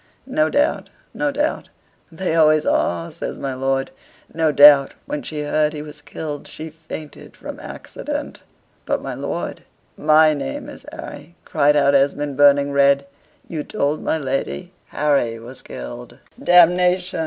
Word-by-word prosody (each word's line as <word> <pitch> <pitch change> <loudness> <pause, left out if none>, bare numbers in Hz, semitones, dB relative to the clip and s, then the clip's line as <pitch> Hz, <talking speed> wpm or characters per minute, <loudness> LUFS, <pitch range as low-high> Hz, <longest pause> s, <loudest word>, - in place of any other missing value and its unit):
"No 155 -12 +1
doubt, 290 - 0 0.2
no 295 - 0
doubt. 295 +2 -2 0.4
They 170 0 -2
always 155 -1 +4
are," 85 -1 0
says - - -6
my 135 -1 -4
lord. 135 +1 -1 0.4
"No 160 -1 +2
doubt, 145 -1 +7
when 150 - -4
she 150 -1 -5
heard 150 +1 +1
he 150 -1 -6
was 150 -1 -11
killed, 150 -2 -6
she 160 0 -8
fainted 155 -1 -10
from - - -8
accident." - - -6 0.5
"But, - - -1
my - - -4
lord, - - -4 0.3
MY 155 +1 +5
name 65 - -5
is - - -12
Harry," 170 - -10
cried 150 -1 +2
out 140 -1 +4
Esmond, 140 +1 +1
burning 140 0 +5
red. 140 0 +3 0.4
"You 155 -3 -4
told 145 +2 -1
my - - 0
lady, 135 - -3
'Harry 140 -6 0
was 120 +3 -10
killed!'" - - -9 0.3
"Damnation! 180 +1 +4
150 Hz, 145 wpm, -21 LUFS, 140-160 Hz, 0.5 s, doubt